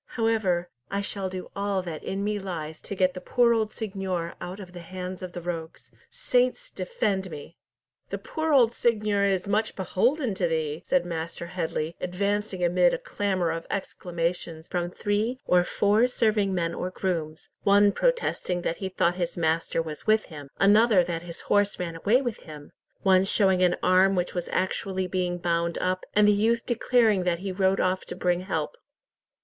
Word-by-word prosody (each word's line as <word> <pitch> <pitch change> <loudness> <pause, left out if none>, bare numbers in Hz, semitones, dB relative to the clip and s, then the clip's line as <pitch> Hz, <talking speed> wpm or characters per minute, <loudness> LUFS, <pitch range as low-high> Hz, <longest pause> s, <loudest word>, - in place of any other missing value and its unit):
However, 215 -7 +1 0.2
I 200 0 -1
shall 200 -1 -3
do 185 0 -7
all 200 -1 -1
that 165 -4 -6
in 195 +1 -3
me 210 0 -1
lies 160 -5 -6
to 200 - -6
get 185 -1 +2
the 185 - -7
poor 240 +3 +3
old 220 -2 0
seignior 190 -6 -3
out 185 +3 -6
of 185 -3 -10
the 175 - -8
hands 185 +1 -6
of 180 -1 -7
the 175 - -5
rogues. 165 -1 -6 0.2
Saints 485 - 0
defend 195 - -2
me!" 155 +1 -9 0.5
"The - - -3
poor 315 0 -3
old 240 -5 +5
seignior 210 -4 +1
is 190 -1 0
much 215 +2 0
beholden 235 - +1
to 185 -2 0
thee," 160 -1 -2
said 270 -6 +1
Master 170 0 -4
Headley, 170 -2 -3
advancing 200 +1 -1
amid - - +4
a - - -3
clamour 200 - -1
of 165 0 -5
exclamations 170 -3 -3
from 175 -1 -2
three 210 +7 -1
or 180 0 +4
four 210 +6 +3
serving 215 -5 +1
men 170 -3 -1
or 180 - -3
grooms, 165 -4 -3
one 205 0 +5
protesting 335 - 0
that 165 - -1
he 190 - -4
thought 175 -1 +1
his 175 -1 -2
master 165 0 0
was 155 +3 -8
with 215 0 +4
him, 145 -2 -9
another 205 -1 +5
that 170 -1 -3
his 170 -1 -7
horse 205 0 +2
ran 170 -2 -4
away 220 +10 +2
with 240 -4 -3
him, 150 -2 -11 0.3
one 190 -1 +5
showing 190 -2 +3
an 180 -1 +4
arm 190 +1 +5
which 180 -1 -1
was 175 -1 -3
actually 190 0 -1
being 180 -1 -1
bound 170 -1 0
up, 185 0 -1
and 210 0 +6
the - - +7
youth 225 +3 +2
declaring 235 -4 +3
that 175 -1 +1
he 190 +2 -4
rode 190 +1 +2
off 185 0 +1
to - - -6
bring 175 -1 +1
help. 190 - -3
185 Hz, 185 wpm, -26 LUFS, 175-210 Hz, 0.5 s, the